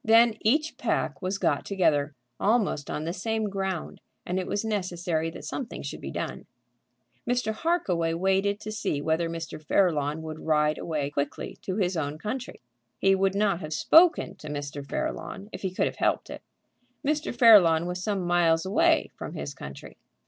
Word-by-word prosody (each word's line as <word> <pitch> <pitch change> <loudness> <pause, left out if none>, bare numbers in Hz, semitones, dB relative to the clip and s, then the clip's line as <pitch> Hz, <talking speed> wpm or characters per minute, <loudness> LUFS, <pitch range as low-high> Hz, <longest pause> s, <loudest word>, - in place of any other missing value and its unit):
Then 230 +1 +6
each 300 +8 +1
pack - - -1
was 185 +1 -1
got - - +1
together, 155 -7 +1 0.2
almost 205 - +1
on 150 - -3
the 165 +2 -3
same 220 +1 -1
ground, 190 -3 -4 0.2
and 180 +1 -1
it 185 - -4
was 205 +2 -1
necessary 175 -6 -1
that 165 - -9
something 255 -4 -5
should - - -6
be - - -5
done. - - -5 0.8
Mr. 245 -3 +1
Harkaway 185 - 0
waited 195 +3 +1
to 215 - -5
see 215 -9 -2
whether 160 +3 0
Mr. 165 -2 -6
Fairlawn 155 -3 +1
would 155 0 -6
ride 150 -1 +1
away 150 -3 -2
quickly 140 0 -4
to 185 - -3
his 185 -3 0
own 150 -2 -2
country. 245 +9 -5 0.4
He 195 - +4
would 195 0 +1
not 200 -4 +2
have 155 -3 -5
spoken 320 - +5
to 155 - -10
Mr. 145 -1 -5
Fairlawn 195 +8 -4
if - - -6
he 190 - -1
could 185 - 0
have - - -3
helped - - 0
it. - - -7 0.6
Mr. 300 +1 0
Fairlawn 200 -9 +7
was 180 +1 -4
some 195 -3 -1
miles 170 -1 +3
away 190 - +3
from - - -7
his 70 0 -5
country. 70 0 -10
180 Hz, 175 wpm, -27 LUFS, 160-210 Hz, 0.8 s, Fairlawn